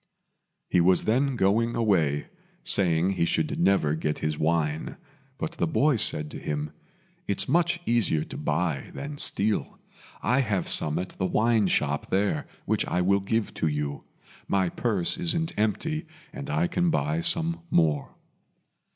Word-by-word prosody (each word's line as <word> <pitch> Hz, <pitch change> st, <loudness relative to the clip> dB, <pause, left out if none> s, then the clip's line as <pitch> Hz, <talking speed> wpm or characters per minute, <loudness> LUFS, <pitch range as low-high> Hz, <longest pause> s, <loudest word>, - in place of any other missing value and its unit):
He 90 Hz, -, +3 dB
was 90 Hz, +2 st, +3 dB
then 130 Hz, +4 st, +1 dB
going 115 Hz, +3 st, +1 dB
away, 85 Hz, -11 st, +1 dB, 0.4 s
saying 90 Hz, -1 st, +3 dB
he 90 Hz, -3 st, 0 dB
should -, -, -1 dB
never 85 Hz, -5 st, +2 dB
get 75 Hz, -1 st, -2 dB
his 75 Hz, 0 st, -2 dB
wine; 80 Hz, 0 st, -1 dB, 0.4 s
but -, -, -3 dB
the 170 Hz, -, -2 dB
boy 150 Hz, -2 st, +2 dB
said 75 Hz, -7 st, +4 dB
to -, -, -7 dB
him, 75 Hz, 0 st, -4 dB, 0.6 s
"It's 100 Hz, -, -1 dB
much 170 Hz, +4 st, +2 dB
easier 110 Hz, -10 st, +1 dB
to -, -, -10 dB
buy 75 Hz, -1 st, -2 dB
than 145 Hz, 0 st, -6 dB
steal. 105 Hz, +1 st, +1 dB, 0.5 s
I 125 Hz, -, +2 dB
have 105 Hz, -8 st, 0 dB
some 75 Hz, -1 st, +3 dB
at 90 Hz, 0 st, -3 dB
the 95 Hz, -, -3 dB
wine 110 Hz, 0 st, +2 dB
shop 70 Hz, -4 st, -1 dB
there 95 Hz, -5 st, 0 dB, 0.2 s
which -, -, 0 dB
I 90 Hz, -, 0 dB
will 100 Hz, +2 st, +3 dB
give 110 Hz, +3 st, -2 dB
to -, -, -1 dB
you. 75 Hz, -1 st, -3 dB, 0.4 s
My 95 Hz, -2 st, +1 dB
purse 100 Hz, -, -1 dB
isn't 165 Hz, -1 st, -1 dB
empty, 155 Hz, -, -1 dB, 0.3 s
and 140 Hz, +1 st, -7 dB
I 165 Hz, +4 st, +1 dB
can 175 Hz, 0 st, 0 dB
buy 165 Hz, 0 st, 0 dB
some 170 Hz, -1 st, +1 dB
more." 75 Hz, -4 st, +1 dB
100 Hz, 155 wpm, -26 LUFS, -, 0.6 s, said